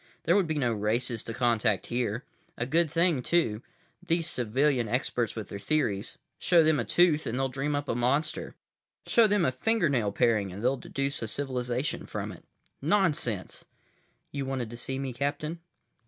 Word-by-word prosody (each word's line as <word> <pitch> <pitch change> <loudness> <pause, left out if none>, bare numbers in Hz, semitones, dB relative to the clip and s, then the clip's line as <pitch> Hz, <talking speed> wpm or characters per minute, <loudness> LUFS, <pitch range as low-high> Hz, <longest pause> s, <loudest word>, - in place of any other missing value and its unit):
There 170 - +3
would 195 -4 +3
be 155 - -1
no 125 -5 +1
races 115 +2 0
to 115 - -4
contact 115 -4 +1
here. 120 0 -2 0.3
A 120 - -1
good 165 +5 +2
thing, 165 -5 +2
too. 120 -8 +1 0.4
These 170 -2 0
civilian 125 +1 +1
experts 120 0 -1
with 110 -2 -6
their 100 - -6
theories—show 155 - +1
them 155 -2 +3
a 120 - -1
tooth 165 -3 +3
and 115 - -2
they'll 135 0 0
dream 140 +3 -2
up 145 0 -2
a - - 0
monster. 135 +6 -1 0.5
Show 230 -2 +5
them 205 -4 +2
a 130 - +2
fingernail 135 - +1
paring 110 -6 +2
and 100 +4 -7
they'll 130 +2 +3
deduce 140 +2 -2
a 115 - -2
civilization 125 +2 -2
from - - -4
it. - - -12 0.4
Nonsense! 150 - 0 0.7
"You 140 -1 -3
wanted 130 -4 -3
to - - -7
see 130 +2 -4
me, 135 -2 -3
Captain?" 145 +5 -2
130 Hz, 170 wpm, -28 LUFS, 120-155 Hz, 0.7 s, Show